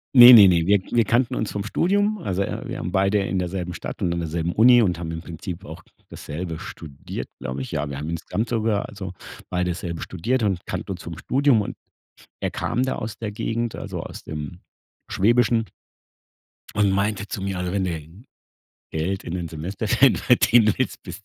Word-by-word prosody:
Ne, 125 0 +12
ne, 105 -4 +10
ne, 85 -3 +3
wir 100 +2 +4
wir 120 -1 +4
kannten 120 +2 +1
uns 110 - -2
vom 100 -1 -3
Studium. 205 - +1
Also 100 - -2
e - - -3
wir - - -5
haben 90 - -4
beide 95 +2 +2
in 95 -1 -1
derselben 90 0 -3
Stadt - - -7
und 90 -3 +1
an 85 - -1
derselben 85 +1 -2
Uni 120 +2 +7
und 90 -5 +1
haben 85 -1 -5
im 80 0 -5
Prinzip 85 +2 -7
auch 80 +3 -10 0.3
dasselbe 80 +2 -6
studiert, 75 -3 -8
glaube 65 +1 -4
ich. 65 - -6
Ja, 75 -1 -2
wir 70 - -5
haben 75 +3 -4
insgesamt 105 +7 -3
sogar 110 -3 0
also 95 -3 -7 0.4
beide 90 0 0
dasselbe 85 -1 -5
studiert 115 +9 -1
und 95 -5 -1
kannten - - -5
uns - - -9
vom - - -7
Studium 135 -4 +2
und - - -5 0.7
er - - -1
kam 125 - -1
da 130 - -1
aus 110 0 -5
der 110 -2 -4
Gegend, 115 +2 -3
also - - -5
aus - - -9
dem 75 +2 -6 0.5
Schwäbischen 115 +2 +2 1.1
und 100 -1 +3
meinte 100 +1 0
zu 100 - -5
mir 95 -1 -2
also: 90 0 -2
„Wenn 100 -1 0
du 85 +4 -6 0.7
Geld 90 +5 -2
in 85 - -5
den 85 -2 -3
Semesterferien 100 - +2
verdienen 115 -3 +4
willst, 130 - -2
bist 95 +2 -9
95 Hz, 195 wpm, -23 LUFS, 85-115 Hz, 1.1 s, Ne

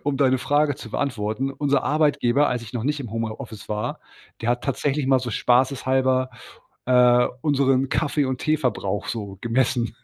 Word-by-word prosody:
um 145 -1 -1
deine 130 -2 +3
Frage 145 +1 +1
zu 110 - -10
beantworten. 120 0 -2
Unser 140 0 0
Arbeitgeber, 145 -2 +2
als 125 -2 -2
ich 115 - -11
noch 120 -1 -3
nicht 150 +1 0
im 120 -6 -6
Home 115 -1 -2
äh, - - -4
Office 110 -3 -10
war, 105 0 -3 0.4
der 115 - 0
hat 120 0 -1
tatsächlich 140 0 -1
mal 130 -1 +4
so 120 -2 -4
spaßeshalber, 130 +1 +2 0.6
äh, 125 -1 +5 0.2
unseren 135 -3 +2
Kaffee 145 0 0
und 130 -1 -3
Tee 155 0 +1
Verbrauch 105 -7 -2
so 100 -4 -5
gemessen. 120 0 0
130 Hz, 180 wpm, -23 LUFS, 120-140 Hz, 0.6 s, äh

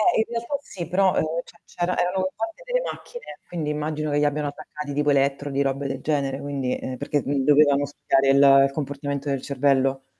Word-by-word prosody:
Eh 360 - +3
in - - +3
realtà 235 +4 -3
sì, 175 -9 -7
però, 190 +1 +2
ehm, - - +2 0.2
c'è - - -18
c'erano 175 +1 -2
erano 185 +1 0
fatte 225 - -5
delle - - 0
macchine, 485 0 -9
quindi 160 -4 -3
immagino 150 0 -2
che 145 - +2
li 150 - +3
abbiano 145 0 0
attaccati 145 0 -7
tipo 145 +1 +1
elettrodi, 140 0 +1
robe 140 0 0
del 135 0 -4
genere, 140 -3 -1
quindi, 140 -3 -2
ehm, 130 0 -5
perché, 145 - 0
mhmm, 140 -1 0
dovevano 145 -1 +5
studiare 135 -1 +1 0.4
il 135 - +1
comportamento 140 0 -4
del 135 -2 -1
cervello. 135 -1 +1
145 Hz, 195 wpm, -24 LUFS, 140-170 Hz, 0.4 s, dovevano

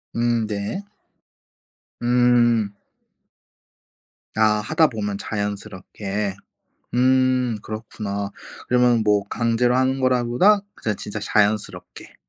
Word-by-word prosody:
음 120 -1 +1
네. 105 - -3 1.2
음. 120 -3 +3 1.6
아 110 - +3 0.2
하다 155 +8 +3
보면 105 -5 -4
자연스럽게. 100 -1 -4 0.6
음 130 -1 +2
그렇구나. 105 -2 -5 0.4
그러면 125 -2 +3
뭐 105 -1 +3
강제로 115 +2 +1
하는 130 +1 +1
거라기 125 -2 +1
보다 200 - +4
그냥 105 -2 -3
진짜 105 +1 -6
자연스럽게. 105 0 -1
115 Hz, 200 characters per minute, -22 LUFS, 105-125 Hz, 1.6 s, 보다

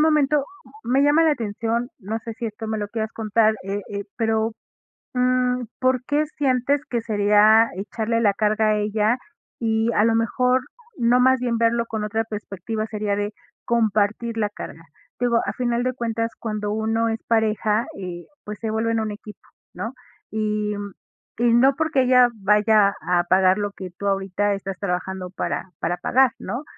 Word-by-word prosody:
momento, 300 -2 +3 0.4
me 250 +4 +2
llama 295 +3 +5
la 320 - +4
atención, 230 -1 -2
no 215 +4 -3
sé 225 0 -7
si 235 -1 -4
esto 220 +1 -6
me 220 - -2
lo 205 - -3
quieras 220 0 -3
contar, 220 0 +2
eh 200 +2 -3
eh, 200 0 -4
pero, 225 -1 +1 0.6
mm, 250 0 +2 0.2
¿por 255 -1 +2
qué 295 +1 +1
sientes 275 0 +1
que 235 -3 -1
sería 215 +1 +4
echarle 225 +4 -2
la 205 -3 +4
carga 215 +1 +1
a 215 - +3
ella?, 210 +3 +1 0.5
y 225 +1 +1
a 210 - +3
lo 225 - +3
mejor, 250 +3 +2 0.4
no 240 +1 +3
más 260 0 +4
bien 240 -2 0
verlo 230 0 +2
con 220 -1 -3
otra 220 +2 -1
perspectiva, 215 0 -5
sería 210 -2 -2
de 205 +1 -2 0.3
compartir 225 0 +1
la 210 -2 +1
carga. 165 -4 -9 0.4
Digo, 240 -1 +3
a 195 - -2
final 240 0 -1
de 255 0 0
cuentas 230 -2 -2
cuando 210 -2 -3
uno 225 +1 0
es 225 0 -3
pareja, 220 -1 +1
eh, 175 -2 -6 0.2
pues 210 0 -7
se 225 - -3
vuelven 225 +1 0
un 220 -1 -2
equipo, 205 -1 -10 0.3
¿no?, 210 +8 -5 0.4
y, 210 -1 -1
mm, 200 -2 -6 0.5
y 240 0 +3
no 265 +3 +5
porque 300 -4 +1
ella 250 -1 +5
vaya 210 0 +4
a 175 -1 +1
pagar 185 0 +4
lo 205 -1 -2
que 185 -2 -8
tú 200 - -6
ahorita 195 +1 0
estás 195 -1 -5
trabajando 185 -1 -3
para 185 0 -3
para 175 +1 -1
pagar, 260 0 +3
¿no?, 240 +9 -5
220 Hz, 175 wpm, -23 LUFS, 205-235 Hz, 0.6 s, llama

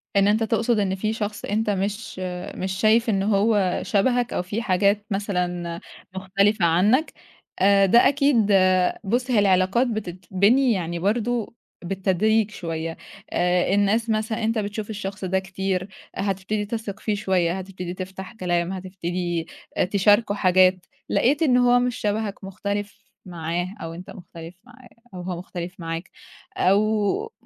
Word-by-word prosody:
إن 200 0 +4
أنت 215 +2 +2
تقصد 225 +1 +1
إن 190 -2 0
في 215 +3 -1
شخص 215 -1 -4
أنت 215 +1 -1
مش 200 0 -3 0.4
مش 190 0 -3
شايف 225 +2 +3
إن 195 -2 +1
هو 200 -2 +2
شبهك 245 +3 +1
أو - - 0
في 205 +6 -4
حاجات 200 +1 +2
مثلًا 180 -4 -2 0.4
مختلفة 190 +1 +1
عنّك، 205 - +3 0.5
آآ 195 +1 +5
ده 235 +6 +6
أكيد 280 -2 +3 0.7
بُصّ 245 +5 -1
هي 225 - +4
العلاقات 195 +5 +3
بتتبني 205 +4 +1
يعني 170 -2 -3
برضه 230 +4 -1 0.3
بالتدريج 195 +4 +1
شوية، 165 -4 -5 0.3
آآ 180 +1 +1
الناس 210 +3 +2
مثلًا 220 +1 -1
أنت 225 0 +1
بتشوف 205 +1 -4
الشخص 200 -1 -5
ده 190 +1 +1
كتير، 190 0 -3 0.3
هتبتدي 200 +2 -2
تثق 215 -1 -5
فيه 215 - -1
شوية، 185 -3 0
هتبتدي 180 -2 -6
تفتح 190 +2 -7
كلام، 175 -3 -1
هتبتدي 175 -2 -3 0.3
آآ - - +3
تشاركه 205 +2 +3
حاجات، 185 -1 +3 0.2
لقيت 285 +6 +2
إن 255 -6 +4
هو 245 0 +5
مش 245 -1 0
شبهك 210 -1 -2
مختلف 200 +2 -5 0.2
معاه 175 +2 -4
أو 165 0 -5
أنت 180 +3 -10
مختلف 170 -4 -11
معاه 250 0 -17 0.2
أو 180 - -6
هو 180 -1 -4
مختلف 180 0 -7
معاك، 165 +1 -5 0.5
أو 215 - +1
200 Hz, 140 wpm, -23 LUFS, 185-220 Hz, 0.7 s, ده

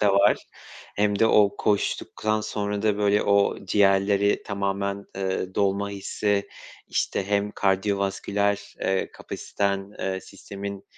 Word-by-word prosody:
da 100 -1 +4
var. 100 +1 +3 0.5
Hem 105 0 +2
de 115 - +5
o 105 -2 +4
koştuktan 110 +1 0
sonra 105 -1 -3
da, 105 -2 +2
böyle, 105 0 +3
o 100 -1 +2
ciğerleri 100 +1 +3
tamamen, 100 0 -2
ııı, 95 -1 -2
dolma 100 0 +1
hissi, 100 0 -1 0.4
işte, 95 - -1
hem 100 0 +1
kardiyovasküler, 100 +1 0
eee, 95 0 0
kapasiten, 100 0 -3
eee, 95 0 -2
sistemin 100 0 -8
100 Hz, 120 wpm, -25 LUFS, 100-105 Hz, 0.5 s, de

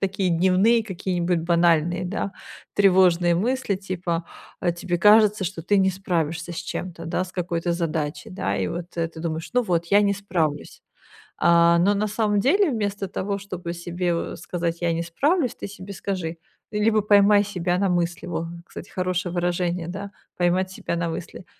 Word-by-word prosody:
такие 195 -1 0
дневные 190 +7 +3
какие-нибудь 180 -3 -1
банальные, 170 +1 +2
да, 195 +1 -3 0.4
тревожные 180 -3 +4
мысли 240 +3 0
типа, 180 -3 -3 0.4
а 175 - +1
тебе 175 +1 -2
кажется, 210 0 +5
что 170 -2 -4
ты 205 +4 +2
не 190 0 +4
справишься 170 -3 -2
с 170 - -8
чем-то, 175 -2 -5
да, 170 +2 -1
с 185 - -12
какой-то 175 -1 -1
задачей, 165 +3 -3
да, 100 - -2
и 95 - 0
вот 175 - -5
ты 165 -1 -2
думаешь: 160 -1 -4
"Ну, 250 - +4
вот, 170 -5 0
я 200 +4 +5
не 200 -1 +3
справлюсь". 165 -7 -2 0.6
А 170 0 +5
оно 190 +4 +4
на 210 +1 0
самом 210 -1 +1
деле, 340 - +3
вместо 205 -4 -2
того, 200 +2 -3
чтобы 185 -3 -6
себе 175 0 -2
в 170 - -3
сказать: 170 0 -3
"Я 170 -1 +2
не 165 - -1
справлюсь", 265 - +1
ты - - -7
себе 200 0 -9
скажи, 180 -4 -4 0.3
ты 210 - -3
либо 215 +1 +3
поймай 205 0 +5
себя 180 -3 -1
на 195 0 +2
мысли, 175 -1 -1
вот, 170 -1 -3 0.2
кстати, - - -10
хорошее 180 -1 -2
выражение, 175 -1 -1
да, 200 +3 -6 0.3
поймать 180 +1 +1
себя 180 - -4
на 170 0 -1
мысли: 165 +2 -7
180 Hz, 175 wpm, -24 LUFS, 170-200 Hz, 0.6 s, кажется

